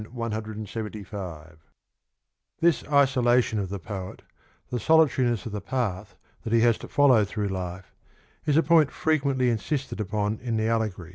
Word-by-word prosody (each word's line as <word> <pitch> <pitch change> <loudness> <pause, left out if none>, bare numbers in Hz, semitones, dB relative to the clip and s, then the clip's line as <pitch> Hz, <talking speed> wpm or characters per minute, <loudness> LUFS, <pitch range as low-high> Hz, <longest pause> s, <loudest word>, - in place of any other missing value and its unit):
175) 105 -7 -6 1.0
This 170 -1 +2
isolation 125 -5 +3
of 95 -2 -3
the 100 - -4
poet, 95 0 -7 0.5
the 125 - -1
solitariness 130 -7 +3
of 115 - -5
the 105 0 -4
path 105 -4 -3 0.3
that 115 - -5
he 115 0 +4
has 115 -1 +3
to - - -9
follow 130 -6 +4
through 105 0 -3
life, 95 0 -6 0.5
is 150 0 +3
a 165 - +5
point 160 -4 +4
frequently 140 -5 +1
insisted 130 +3 -3
upon 105 +1 -2
in 115 -2 -2
the 110 0 0
allegory. 110 -7 -1
110 Hz, 145 wpm, -26 LUFS, 100-130 Hz, 1.0 s, a